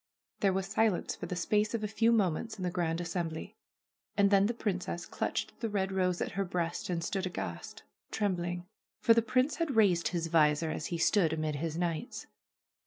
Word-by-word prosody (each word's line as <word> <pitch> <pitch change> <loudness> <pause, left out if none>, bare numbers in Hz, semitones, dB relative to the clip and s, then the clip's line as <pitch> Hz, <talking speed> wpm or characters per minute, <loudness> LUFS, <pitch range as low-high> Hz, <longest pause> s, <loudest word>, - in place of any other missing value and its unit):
There 195 - +3
was 190 0 -1
silence 210 -1 +1
for - - -6
the 180 - -3
space 210 +5 +1
of 220 - -3
a - - 0
few 225 +2 +2
moments 215 0 +1
in 185 - -5
the 180 - 0
grand 170 -2 -1
assembly. 170 +3 -4 0.6
And 200 -1 +4
then 200 0 +5
the 235 - -1
princess 185 -5 -2
clutched - - -3
the 225 - -2
red 195 -2 -1
rose 185 -2 0
at - - -1
her 195 - -1
breast 175 -2 -2
and 170 -2 -1
stood 190 +2 -1
aghast, 85 - -6 0.3
trembling. 175 -4 -1 0.3
For 230 - +6
the 230 - +4
prince 255 +5 +1
had 330 -6 -1
raised 180 -7 +4
his 170 -2 -1
visor 155 -1 +3
as 155 - -3
he 170 - -2
stood 165 -2 +3
amid 155 -2 -1
his 160 +1 -3
knights. 170 -3 -3
180 Hz, 195 wpm, -31 LUFS, 165-210 Hz, 0.6 s, For